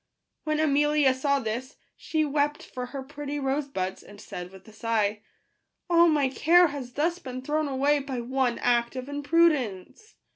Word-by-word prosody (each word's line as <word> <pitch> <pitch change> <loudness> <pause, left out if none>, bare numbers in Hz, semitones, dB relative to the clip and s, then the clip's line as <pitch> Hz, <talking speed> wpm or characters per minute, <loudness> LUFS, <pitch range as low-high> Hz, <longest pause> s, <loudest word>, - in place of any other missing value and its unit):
When 305 0 0
Amelia 295 -2 +3
saw 280 +2 +1
this, 245 +3 -4 0.2
she 315 -1 -1
wept 295 +1 0
for 250 -1 -6
her 270 +1 -6
pretty 290 +1 -5
rose 275 +1 -1
buds, 190 -8 -4
and 205 0 -14
said 180 -3 -7
with 190 +1 -15
a 220 - -14
sigh, 215 -2 -1 0.3
" - - -52
All 340 0 +6
my 295 -4 +3
care 335 +6 +4
has 265 -4 -7
thus 335 +5 0
been 255 -3 -7
thrown 305 +2 0
away 280 +2 +2
by 270 -2 -4
one 250 0 0
act 240 0 +1
of 255 0 -5
imprudence 290 - 0
275 Hz, 175 wpm, -27 LUFS, 245-295 Hz, 0.3 s, All